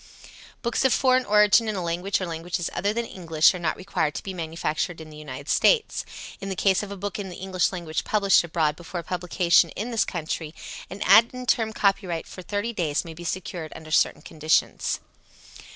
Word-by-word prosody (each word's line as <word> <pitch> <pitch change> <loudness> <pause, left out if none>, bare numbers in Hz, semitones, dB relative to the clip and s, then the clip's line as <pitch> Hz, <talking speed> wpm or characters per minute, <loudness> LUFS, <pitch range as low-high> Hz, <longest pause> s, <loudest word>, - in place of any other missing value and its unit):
Books 235 +2 0
of 265 - +4
foreign 255 0 +3
origin 210 +2 +5
in 215 - -1
a 185 - -3
language 175 +4 -1
or 185 - -2
languages 170 +1 -3
other 200 - 0
than 235 +2 -2
English 165 -6 +2
are 180 - -5
not 165 -2 -1
required 180 -5 -1
to - - -5
be 190 - -5
manufactured 165 0 -3
in 155 -1 -10
the - - -12
United 140 -1 -8
States. 460 -3 +3 0.4
In 195 - -5
the 190 - -3
case 190 0 +2
of 210 - -6
a 200 - -6
book 200 +2 -4
in 195 -2 -5
the 180 - -8
English 185 -1 0
language 170 -4 -3
published 200 -4 +3
abroad 160 -3 0
before 175 +1 -6
publication 175 -1 +2
in 225 +5 -4
this 225 -3 +2
country, 155 0 -4 0.3
an 195 - -5
ad 230 +1 +7
interim 235 -3 0
copyright 195 -5 0
for 185 - -10
30 205 +5 -3
days 160 -7 -1
may 165 - -8
be 170 +2 -10
secured 175 -2 -4
under 155 -1 -10
certain - - +2
conditions. 155 0 0
180 Hz, 200 wpm, -25 LUFS, 165-205 Hz, 0.4 s, ad